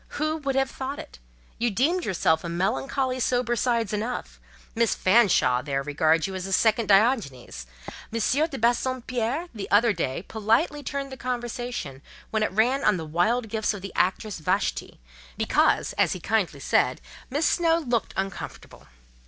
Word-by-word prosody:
Who 310 +1 0
would 275 -3 -2
have 270 0 +1
thought 270 +2 -5
it? - - -10 0.4
You 240 +1 +2
deemed 305 - +1
yourself 160 -4 +1
a 170 - -4
melancholy 255 +8 -1
sober 245 -1 +1
sides 230 -3 0
enough! 225 +4 -4 0.3
Miss 230 -1 +1
Fanshawe 185 - +4
there 135 0 -2
regards 155 +2 +2
you 195 - -4
as 185 0 -4
a - - -6
second 220 +3 +2
Diogenes. 195 - +1 0.4
M. 230 - -2
de 285 +6 +1
Bassompierre, 250 +5 -1
the 210 -4 -6
other 215 +2 +4
day, 165 -2 -3
politely 230 - 0
turned 275 -1 -4
the 265 - -7
conversation 240 - -4 0.3
when 220 - 0
it 215 - +1
ran 245 +7 +2
on 210 -3 +3
the 160 - -5
wild 215 +10 +1
gifts 220 0 -1
of 195 - -9
the 195 - -7
actress 190 +1 0
Vashti, 155 - -1 0.4
because, - - +2
as - - +3
he 185 - -6
kindly 215 0 0
said, - - +2 0.3
'Miss 290 +5 0
Snowe 330 -2 +3
looked 245 -8 -2
uncomfortable. 195 -1 -6
225 Hz, 160 wpm, -25 LUFS, 190-255 Hz, 0.4 s, Fanshawe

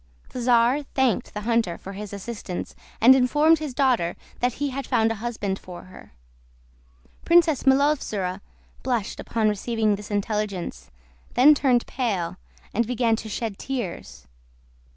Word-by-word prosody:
The 250 - -6
czar 240 +3 +3
thanked 265 -5 -1
the 210 - -3
hunter 225 -6 0
for 195 - -9
his 205 0 -7
assistance, 200 -2 -6 0.3
and 245 +4 +8
informed 295 +5 +4
his 295 -5 -5
daughter 250 -11 +2 0.2
that 245 0 +1
he 285 +1 -3
had 275 +1 -5
found 225 0 +2
a 220 -2 -5
husband 210 -5 -3
for 180 -1 -10
her. 185 - -15 1.1
Princess 335 -5 +3
Milovzora 265 -9 +1 0.4
blushed 240 -5 -2
upon 225 -2 0
receiving 215 +1 0
this 210 0 -10
intelligence, 205 -2 -3 0.5
then 275 +5 +7
turned 255 -4 +2
pale, 190 -9 -2 0.4
and 235 +1 +1
began 240 -2 +1
to 220 - -7
shed 215 -1 -4
tears. 190 - -5
230 Hz, 140 wpm, -24 LUFS, 205-260 Hz, 1.1 s, and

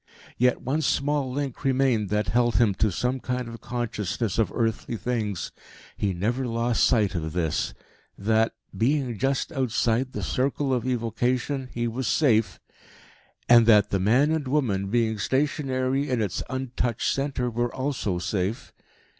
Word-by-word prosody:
Yet 125 0 +3
one 145 +5 0
small 145 -2 0
link 140 -1 -4
remained 130 -6 +2
that 105 0 0
held 120 -1 +2
him 115 -4 +4
to 105 +2 +1
some 125 +9 -1
kind 125 -1 -3
of 115 0 -9
consciousness 115 -2 -2
of 105 -5 +2
earthly 115 0 -1
things: 110 -6 -2 0.4
he 100 - 0
never 115 +9 -1
lost 115 0 +1
sight 110 -6 +2
of 80 -3 -3
this 80 -4 -1 0.4
that, 110 +2 +1 0.2
being 125 -2 0
just 135 +4 0
outside 125 0 0
the - - -4
circle 135 +1 0
of 125 0 -1
evocation, 125 +3 -1
he 120 0 -2
was 120 +2 -3
safe, 120 -5 +2 0.9
and 120 -1 +7
that 105 -3 +5
the 100 - +1
man 125 +10 +3
and 160 -4 -1
woman, 115 -9 0
being 110 -1 +1
stationary 135 +3 0
in 125 -2 +1
its 100 -5 -1
untouched 125 -3 -1
centre, 135 -3 -1
were 120 +1 -1
also 130 -9 -2
safe. 95 +4 -3
120 Hz, 150 wpm, -25 LUFS, 110-130 Hz, 0.9 s, and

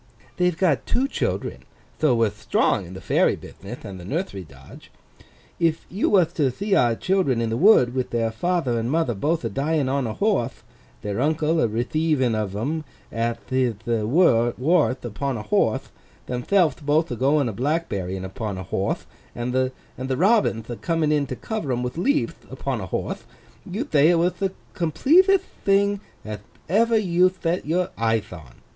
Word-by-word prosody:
They've 180 -2 +1
got 155 -11 +1
two 265 +2 +1
children, - - -2 0.4
tho 150 -6 +3
we're 115 -3 +2
thtrong 105 -2 0
in 90 - -10
the 95 - -8
Fairy - - +2
bithnith 110 +6 -10
and 95 -3 -7
the - - -10
Nurthery 100 - -3
dodge. 65 -5 -15 0.7
If 165 -1 +1
you 195 - +1
wath 185 -5 +3
to 145 -4 +3
thee 200 - -2
our 120 -10 +4
Children 180 -7 +1
in 115 -1 -1
the - - 0
Wood, 130 - +5
with 130 -1 -2
their 115 -1 0
father 130 -1 0
and 115 +1 -2
mother 160 -4 +1
both 155 - -1
a - - 0
dyin' 145 0 0
on 135 -2 0
a 110 - -4
horthe—their 120 - -3
uncle 155 +2 +1
a - - +3
retheiving 130 +3 0
of 105 -3 -2
'em 150 +9 -2 0.3
ath 115 0 -2
hith 120 -4 0
wardth, 125 +3 +2
upon 125 +3 -3
a 105 - -6
horthe—themthelvth 150 - 0
both 155 +3 +1
a - - -1
goin' 140 +3 +2
a 110 - -3
black 150 +10 -1
berryin' 95 -1 -4
on 105 -4 -3
a 95 - -5
horthe—and 120 +5 -4
the 130 0 +1 0.5
Robinth 190 - +2
a 120 - -5
coming 165 -3 0
in 145 -2 +1
to 130 - -4
cover 215 - -4
'em 125 0 -1
with 125 - -3
leavth, 280 - -1
upon - - -3
a - - -5
horthe—you'd 210 +10 -6
thay 150 +2 +5
it 175 - +4
wath 175 +1 0
the 195 -1 0 0.2
completetht 335 - +4 0.2
thing 200 0 +3 0.3
ath 105 -2 -6 0.3
ever 225 +5 +3
you 185 -3 +3
thet 175 -3 -3
your 180 +3 +1
eyeth 110 -3 0
on! 80 -8 -13
135 Hz, 170 wpm, -23 LUFS, 115-175 Hz, 0.7 s, Wood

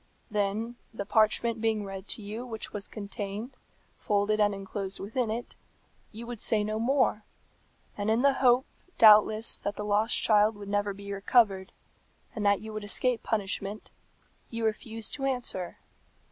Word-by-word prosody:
Then, 210 +3 -1
the 210 -3 -5
parchment 220 +2 +2
being 220 -2 0
read 195 0 -7
to 215 - -4
you 215 +4 -5
which 225 -3 -6
was 205 -1 -3
contained, 205 +3 -6 0.4
folded 210 +1 +1
and 205 -1 +4
enclosed 195 0 -5
within 225 +4 -2
it, 230 +2 -4 0.6
you 225 +2 -8
would 240 -2 -7
say 215 -1 +2
no 215 +1 -2
more; 245 -3 +2 0.7
and 205 +1 -2
in 225 +3 +2
the 280 -1 +5
hope, 250 0 +5 0.3
doubtless, 215 0 +6
that 205 - -3
the 210 - -5
lost 210 +3 +2
child 215 0 +4
would 205 -1 -9
never 205 0 0
be 200 0 -7
recovered, 195 -2 +2 0.6
and 215 - -4
that 200 -1 +3
you 220 0 -8
would 215 -1 -5
escape 235 +3 0
punishment, 205 -1 -3 0.6
you 230 -1 -3
refuse 220 0 -1
to 275 -2 -3
answer. 245 -9 -2
215 Hz, 160 wpm, -29 LUFS, 205-230 Hz, 0.7 s, doubtless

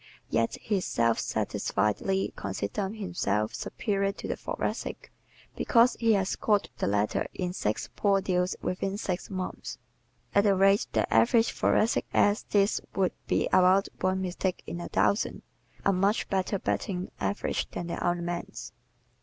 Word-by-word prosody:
Yet 115 0 +1
he 205 -3 -1
self 115 -8 +1
satisfiedly 105 - 0
considers 105 - -3
himself 110 - -1
superior 200 -2 -1
to - - -7
the - - -1
Thoracic - - -4 0.4
because 235 0 +4
he 230 -1 +4
has 195 -2 +1
caught 205 -2 +1
the - - 0
latter 105 +1 +1
in 180 -1 -2
six 110 - -2
"poor 200 -1 +3
deals 180 -1 0
within 195 +2 -2
six 185 -3 -3
months." 185 -2 -5 0.6
At 200 +1 +4
the 200 -1 +4
rate 195 +1 +4
the - - +2
average 235 -1 +4
Thoracic 220 +2 +2
acts 205 +1 +4
this 200 0 +2
would 190 -2 +1
be - - +2
about 185 +2 +5
one 185 0 0
mistake 185 0 -2
in 175 - -5
a - - -6
thousand 200 - +1 0.4
a 195 - +4
much 195 +4 +1
"better 195 +1 0
batting 185 -1 -2
average" 205 - -1
than 175 - -5
the 170 - -4
other 175 0 0
man's. 175 0 -5
190 Hz, 150 wpm, -28 LUFS, 175-200 Hz, 0.6 s, about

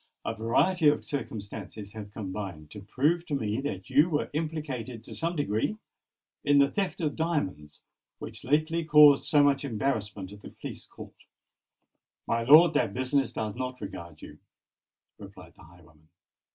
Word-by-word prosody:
A - - -1
variety 150 - +2
of 145 - -1
circumstances 105 -5 -6
have 105 -2 -9
combined 95 -7 -6
to 105 - -9
prove 145 - 0
to 145 - -1
me 110 -3 -1
that 95 -10 -5
you 155 +5 +5
were 150 -3 -1
implicated, 145 -7 -4
to - - -10
some 170 +1 -2
degree, 145 - -1 0.7
in 145 0 +4
the 140 0 +4
theft 195 -3 -2
of 150 -3 -1
diamonds 95 - -3 0.3
which - - -9
lately 155 +5 +1
caused 150 -2 +7
so 145 -2 +4
much 140 -1 +2
embarrassment 105 -6 -3
at 105 - -13
the - - -10
police - - -9
court." - - -13 1.0
"My 115 - 0
lord, 155 +7 +7
that 100 - 0
business 130 +1 0
does 110 -2 -3
not 125 +1 -5
regard 85 -6 -9
you," 75 0 -11 0.8
replied - - -12
the - - -19
highwayman. 80 -2 -21
125 Hz, 155 wpm, -28 LUFS, 100-150 Hz, 1.0 s, caused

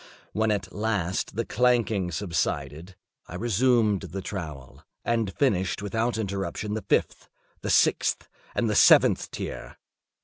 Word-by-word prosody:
When 110 +1 +1
at 105 -2 -2
last 100 -4 -2
the 115 +1 -1
clanking 115 -6 +1
subsided, 80 -1 -3 0.3
I 90 - -8
resumed 115 -1 +2
the 95 +1 -6
trowel, 75 - -7 0.2
and 115 -4 0
finished 100 -7 0
without 110 +3 -1
interruption 100 0 -3
the 110 - -2
fifth, - - -1 0.3
the - - -4
sixth, - - +2 0.3
and 115 - +1
the 105 - 0
seventh - - +5
tier. - - -7
105 Hz, 130 wpm, -26 LUFS, 90-110 Hz, 0.3 s, seventh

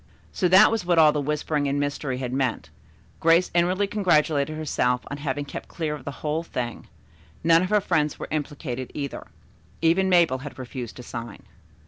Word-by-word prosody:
So 185 - +1
that 190 +5 +7
was 225 -4 -1
what 175 -1 +1
all 155 -2 +7
the 150 - -1
whispering 150 0 -1
and 140 +1 0
mystery 145 -2 -2
had 125 -1 -4
meant. 130 -3 -1 0.5
Grace 165 +2 +4
inwardly 180 +3 +2
congratulated 155 -7 +1
herself 125 -5 0
on 145 - -4
having 145 0 -3
kept - - -8
clear 160 -3 -3
of 145 -4 -8
the - - -3 0.2
whole 150 +2 0
thing. 125 -8 -5 0.6
None 165 0 +5
of 185 - -1
her 210 0 +3
friends 150 -5 0
were - - -6
implicated, 140 -4 -4
either. 140 -2 -5 0.5
Even 175 +4 +3
Mabel 170 -7 +4
had 145 +2 -9
refused 125 -2 -7
to 125 - -9
sign. 115 -3 -8
150 Hz, 180 wpm, -25 LUFS, 135-170 Hz, 0.6 s, that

